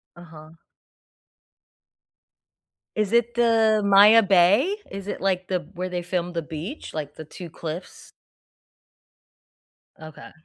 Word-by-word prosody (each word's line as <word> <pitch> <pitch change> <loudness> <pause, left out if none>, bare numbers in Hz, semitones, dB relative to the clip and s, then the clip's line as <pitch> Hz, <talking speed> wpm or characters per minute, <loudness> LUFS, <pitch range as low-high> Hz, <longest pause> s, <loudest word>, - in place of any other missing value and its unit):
Uh-huh. 160 -3 -14 2.5
Is 215 -2 -1
it 235 0 +2
the 225 -2 +3
Maya 205 +3 +7
Bay? 200 - +3
Is 195 0 -8
it, - - -5
like, 185 -1 -1
the 185 -1 -1
where 185 0 -5
they 180 -1 -3
filmed 175 0 -3
The 170 - -2
Beach? 160 - -8
Like, 150 -2 -6
the 160 - -9
2 175 +3 -10
cliffs? 165 +2 -9 1.9
Okay. 155 -2 -12
185 Hz, 115 wpm, -23 LUFS, 170-215 Hz, 2.5 s, Maya